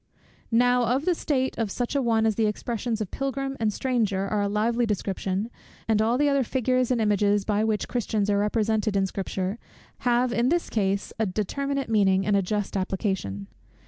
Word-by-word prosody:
Now 245 +1 +3
of 275 - -2
the 365 - +3
state 265 -5 -1
of 225 -3 0
such 245 +6 -3
an 275 - +2
one 225 -2 +2
the 220 0 +2
expressions 225 +1 -2
of 205 - -4
Pilgrim 275 0 -3
and 220 -2 +1
Stranger 210 -6 0
are 210 0 0
a 200 - +1
lively 230 +3 +1
description; 195 +1 -2 0.4
and 220 -1 +3
all 230 +3 +2
the 290 +2 +3
other 280 -1 +3
figures 255 0 0
and 250 -2 +1
images, 205 -1 +2
by 210 0 +1
which 220 -1 0
Christians 215 -4 -1
are 200 -1 +2
represented 215 0 0
in 195 -1 +3
Scripture, 190 +2 -3 0.4
have 245 0 +2
in 240 +2 +2
his 345 +2 0
case 200 -2 -1
a 220 - +1
determinate 275 +8 -2
meaning 195 -4 +3
and 205 - +2
a 200 - +3
just 205 +2 -2
application. 190 - -2
220 Hz, 185 wpm, -26 LUFS, 200-245 Hz, 0.4 s, Now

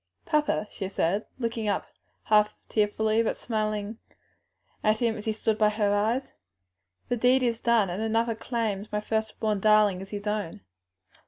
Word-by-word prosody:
"Papa," 300 -8 +1
she 190 - -5
said, 195 +2 0
looking 230 -3 -2
up 200 - 0 0.4
half 210 -1 +3
tearfully, 215 +1 +2
half 230 - 0
smilingly 215 -1 -2 0.9
at 215 +1 +3
him 230 -1 +1
as 210 - -8
he 220 - +1
stood 220 0 -1
at 210 0 +4
her 210 -1 +1
side, 220 +6 0 0.8
"the 245 - 0
deed 250 +2 +3
is 235 -2 +1
indeed - - -30
done, 230 -5 +4
and 185 +5 -3
another 225 +1 +1
claims 220 -3 -3
my 210 - 0
first 220 0 -2
born 215 -2 0
darling 210 -2 +4
as 195 - -9
his 205 0 -6
own." 210 - -3
215 Hz, 170 wpm, -27 LUFS, 210-225 Hz, 0.9 s, at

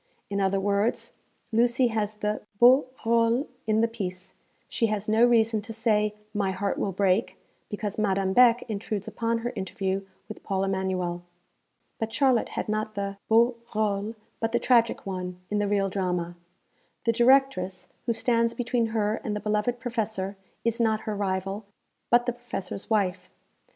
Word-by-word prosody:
In 200 0 0
other 195 0 +2
words, 205 +4 0 0.4
Lucy 240 +2 +3
has 215 -2 -2
the 210 0 -2 0.2
beau 255 +4 +6 0.2
rôle 230 +3 +3 0.2
in 215 0 +3
the 230 - +4
piece, 185 -5 -6 0.3
she 230 - 0
has 210 -1 -2
no 220 +2 +4
reason 225 -2 +4
to 225 +2 -8
say, 210 -2 +1 0.2
'My 205 -2 0
heart 200 +1 -2
will 195 - 0
break,' 190 +3 +1 0.3
because 205 0 -4
Madame 195 -2 +1
Beck 245 0 +6
intrudes 210 -2 -4
upon 230 0 -1
her 240 - -2
interview 195 0 -2 0.2
with 215 - -9
Paul 195 -1 -1
Emanuel. 190 -2 -1 0.8
But 225 0 -2
Charlotte 250 -1 +2
had - - -1
not 215 0 -2
the 200 0 -3
beau 235 +2 +4 0.2
rôle, 210 0 -1 0.2
but 225 0 -1
the - - +3
tragic 235 -2 +3
one, 180 -2 -4
in 210 - +1
the 205 - +1
real 200 -1 +2
drama. 180 -3 -2 0.7
The 230 - +3
Directress, 230 -7 +3 0.2
who 235 - +2
stands 230 0 +1
between 240 -1 0
her 220 -1 -1
and 210 - -2
the - - -2
beloved 210 +4 0
Professor, 220 -6 -2 0.3
is 230 +1 +1
not 220 -1 +2
her 215 - -3
rival, 195 +1 -2 0.5
but 240 0 +4
the 245 - 0
Professor's 240 -5 -6
wife. 185 -4 0
215 Hz, 160 wpm, -27 LUFS, 195-230 Hz, 0.8 s, beau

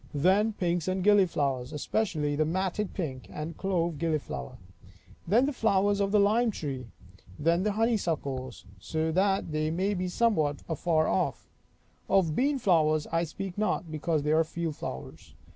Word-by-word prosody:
Then 190 +9 +3
pinks 175 -3 -1
and 185 0 0
gilliflowers, 150 -11 +2
especially 150 -2 -1
the 155 - +2
matted 185 +5 -2
pink 135 -9 -4
and 155 +2 -5
clove 170 -5 -1
gilliflower. 155 - -3 0.7
Then 230 +9 +4
the 290 - -1
flowers 205 -3 +2
of 200 -1 +1
the 210 - +4
lime 220 +4 +3
tree. 135 - -5 0.5
Then 170 +3 +2
the 210 +1 0
honeysuckles, 165 - -1
so 160 - -2
they 170 -4 +1 0.2
be 185 -1 -2
somewhat 175 -8 +1
afar 160 0 +1
off. 95 - -1 0.6
Of 170 -6 +3
beanflowers 175 - +2
I 165 0 +1
speak 190 +4 -6
not, 200 -5 -1
because 155 0 -1
they 150 - +1
are 160 +1 +4
field 165 -1 -4
flowers. 65 - -8
170 Hz, 145 wpm, -28 LUFS, 155-200 Hz, 0.7 s, Then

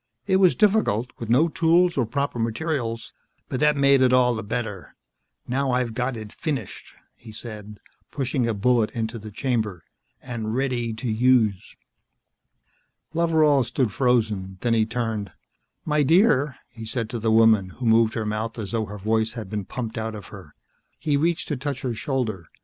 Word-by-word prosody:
It 190 - +3
was 185 -2 +5
difficult 195 - +2
with 115 - -6
no 135 +8 +4
tools 170 +2 +3
or 125 -5 +1
proper 140 0 -2
materials 115 0 -2 0.4
but 130 - -2
that 150 -1 +3
made 140 -1 +5
it 130 -1 +4
all 125 -1 +4
the 110 - -3
better. 110 -3 -5 0.5
Now 135 +1 0
I've 125 -2 0
got 125 +1 -2
it 110 -1 -9
finished," 135 - -5 0.2
he 115 - -13
said, 105 -2 -9 0.3
pushing 130 -3 -1
a 115 - -1
bullet 115 +1 +2
into 115 0 -3
the 110 +1 -9
chamber, 110 - -2 0.4
"and 115 -3 -4
ready 125 -3 -1
to 110 +3 -5
use." 110 -3 +2 1.4
Loveral 160 -4 +3
stood 125 -2 -1
frozen, 110 -7 0
then 120 -1 +1
he 110 -1 +2
turned. 115 -4 -3 0.5
"My 150 -1 +2
dear," 150 - +3 0.2
he 115 - -10
said 115 0 -3
to 120 - -3
the 110 0 +1
woman 110 -4 +5
who 125 +6 -7
moved 115 0 +4
her 110 - -2
mouth 110 +2 -3
as 105 -4 -5
though 115 -2 -1
her 105 0 -8
voice 110 +2 0
had 110 -5 -7
been 105 -3 -3
pumped 115 -1 -5
out 110 0 -4
of 105 -4 -10
her. - - -12 0.4
He 150 -2 0
reached 165 +4 0
to 150 - -1
touch 140 0 -4
her 125 -2 -1
shoulder. 110 - -3
120 Hz, 175 wpm, -24 LUFS, 110-135 Hz, 1.4 s, was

